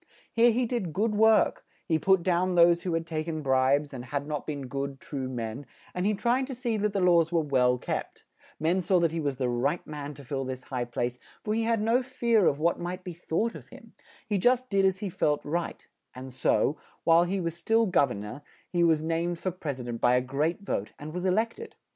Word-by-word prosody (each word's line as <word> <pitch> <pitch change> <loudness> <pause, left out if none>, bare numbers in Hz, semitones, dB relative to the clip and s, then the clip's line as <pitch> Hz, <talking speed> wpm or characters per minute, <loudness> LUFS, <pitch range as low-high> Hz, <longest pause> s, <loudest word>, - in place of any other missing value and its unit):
Here 235 +1 +5
he 240 +2 +1
did 225 -9 -3
good 210 +4 +1
work; 220 +1 +4 0.2
he 160 -3 +1
put 190 +2 +3
down 180 0 +1
those 170 0 +5
who 175 -2 -1
had 165 0 -2
tak 155 -1 -3
en 155 -2 -3
bribes, 135 +2 +2
and 125 -2 -7
had 140 +2 -3
not 150 -1 -4
been 145 -3 -4
good, 135 +1 -4
true 135 -3 -5
men, 120 +2 -5 0.3
and 180 +2 -1
he 210 - +2
tried 250 +5 +1
to 265 - -5
see 240 -2 -2
that 210 0 0
the 200 - 0
laws 170 -3 +4
were 165 -2 +2
well 125 -3 +2
kept; - - -5 0.3
men 170 +5 +1
saw 185 +1 +2
that 170 -2 +2
he 165 - -3
was 140 -4 -2
the 130 - 0
right 125 +7 -1
man 145 -1 -6
to 140 0 -12
fill 135 +1 -3
this 130 -1 -5
high 125 -2 -3
place, 120 +1 -3 0.2
for 210 - -1
he 225 +1 0
had 225 -2 +1
no 230 +3 +3
fear 235 -5 +2
of 140 - +2
what 170 +3 +1
might 180 +1 -5
be 180 - -6
thought 175 +7 -1
of - - -11
him; - - -14 0.3
he 205 -3 0
just 250 +3 +2
did 195 -1 +3
as 190 -1 +2
he 205 - -2
felt 150 -5 0
right; 170 +3 -3 0.3
and 130 0 -8
so, 140 +3 +1 0.3
while 170 +1 +5
he 190 +2 -1
was 170 -2 -3
still 225 +7 +2
gov 175 -8 +3
ern 100 -3 -5
or, 105 +8 -8 0.3
he 175 -1 +2
was 160 -2 +3
named 165 +2 -1
for 185 - -2
pres 150 -7 -5
i - - -6
dent 120 -1 -5
by 125 0 +4
a - - +4
great 145 +8 -1
vote, 110 - -3
and 155 +1 -8
was 180 +1 -2
e - - +3
lect 220 - 0
ed. 460 - -9
165 Hz, 245 wpm, -28 LUFS, 140-195 Hz, 0.3 s, Here